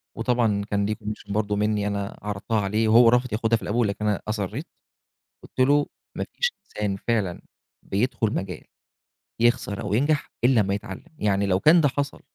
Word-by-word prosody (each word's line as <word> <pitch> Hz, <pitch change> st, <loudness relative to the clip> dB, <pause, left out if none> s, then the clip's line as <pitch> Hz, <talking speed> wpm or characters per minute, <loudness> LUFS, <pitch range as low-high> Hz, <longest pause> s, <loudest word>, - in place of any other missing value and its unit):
وطبعًا 115 Hz, -5 st, +1 dB
كان 100 Hz, 0 st, +1 dB
ليه 105 Hz, +1 st, -1 dB
commission 105 Hz, -1 st, -7 dB
برضه 105 Hz, 0 st, 0 dB
منّي 105 Hz, 0 st, 0 dB
أنا 100 Hz, -1 st, -4 dB
عرضتها 105 Hz, +2 st, -2 dB
عليه 105 Hz, +3 st, 0 dB
وهو 115 Hz, +1 st, +7 dB
رافض 125 Hz, -1 st, +2 dB
ياخدها 115 Hz, +1 st, +2 dB
في -, -, -14 dB
الأول 115 Hz, +1 st, +1 dB
لكن 105 Hz, +1 st, -3 dB
أنا 105 Hz, -, 0 dB
أصرّيت. 105 Hz, -3 st, -3 dB, 0.8 s
قُلت -, -, -13 dB
له: 145 Hz, 0 st, +4 dB, 0.3 s
"ما -, -, -2 dB
فيش 485 Hz, 0 st, +1 dB
إنسان 105 Hz, -, -3 dB
فعلًا 105 Hz, -7 st, 0 dB, 0.4 s
بيدخل 110 Hz, +1 st, 0 dB
مجال 95 Hz, -2 st, -4 dB, 0.8 s
يخسر 115 Hz, -4 st, +1 dB
أو -, -, -2 dB
ينجح 145 Hz, +5 st, +1 dB
إلّا 120 Hz, -3 st, +5 dB
أمّا 100 Hz, 0 st, 0 dB
يتعلم. 100 Hz, -, -6 dB
يعني 100 Hz, -1 st, +1 dB
لو 95 Hz, -1 st, +2 dB
كان 165 Hz, -, +6 dB
ده 145 Hz, -, +4 dB
حصل 140 Hz, +2 st, -3 dB
105 Hz, 175 wpm, -24 LUFS, 100-120 Hz, 0.8 s, وهو